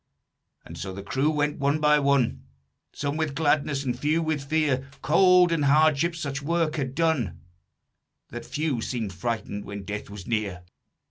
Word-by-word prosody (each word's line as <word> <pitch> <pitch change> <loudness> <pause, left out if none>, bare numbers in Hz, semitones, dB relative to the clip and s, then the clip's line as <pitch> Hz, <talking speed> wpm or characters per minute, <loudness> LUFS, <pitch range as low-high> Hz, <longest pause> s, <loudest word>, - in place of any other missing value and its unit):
"And - - -10
so 95 - -5
the 100 +1 -7
crew 135 +8 0
went 150 -1 0
one 140 +2 +1
by 150 0 +4
one, 140 -3 +1 0.5
Some 145 +1 -3
with 155 -3 -2
gladness, 145 -2 +1
and 125 -3 -1
few 155 +3 +1
with 155 -3 -1
fear, 140 -3 0
Cold 180 +4 +5
and 160 -3 +1
hardship 155 +3 +3
such 140 -4 -4
work 165 +1 0
had 135 -2 -3
done 160 - 0 0.9
That - - -7
few 150 -6 -2
seemed 110 -5 -3
frightened 105 +1 -3
when 100 0 -7
death 105 +2 -5
was 100 -3 -9
near. 105 -6 -2
140 Hz, 160 wpm, -26 LUFS, 120-155 Hz, 0.9 s, Cold